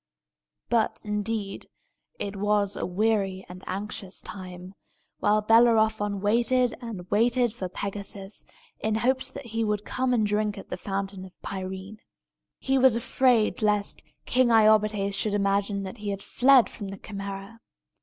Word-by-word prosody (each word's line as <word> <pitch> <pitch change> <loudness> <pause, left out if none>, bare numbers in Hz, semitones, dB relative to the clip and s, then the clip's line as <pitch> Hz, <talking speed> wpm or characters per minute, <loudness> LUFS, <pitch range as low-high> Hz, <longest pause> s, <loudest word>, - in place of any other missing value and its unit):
But, 230 -2 +1
indeed, 210 -1 -3 0.5
it 200 0 -4
was 205 0 +1
a - - -3
weary 195 -1 0
and 180 +1 -11
anxious 195 0 -5
time, 185 -1 -9 0.5
while 210 +1 +2
Bellerophon 220 -3 +4
waited 240 +4 +2
and 210 -7 -7
waited 235 +2 +3
for 190 -6 -5
Pegasus, 200 +1 -5 0.4
in 215 0 0
hopes 255 +4 +1
that 280 - -9
he 225 0 -2
would 210 -1 -1
come 255 0 -1
and 230 -4 +2
drink 210 0 0
at 195 - -10
the - - -3
Fountain 195 0 -4
of 185 -1 -14
Pirene. 190 +2 -6 0.6
He 270 0 +1
was 260 -3 +6
afraid 235 -2 +2
lest 210 -1 +1 0.2
King 255 0 +3
Iobates 215 -2 +4
should 205 +1 +1
imagine 200 0 0
that 195 +4 -7
he 205 0 -4
had 200 -1 -4
fled 260 -1 +5
from 205 - -7
the 195 0 -7
Chimæra. 200 +2 -7
210 Hz, 145 wpm, -26 LUFS, 195-225 Hz, 0.6 s, was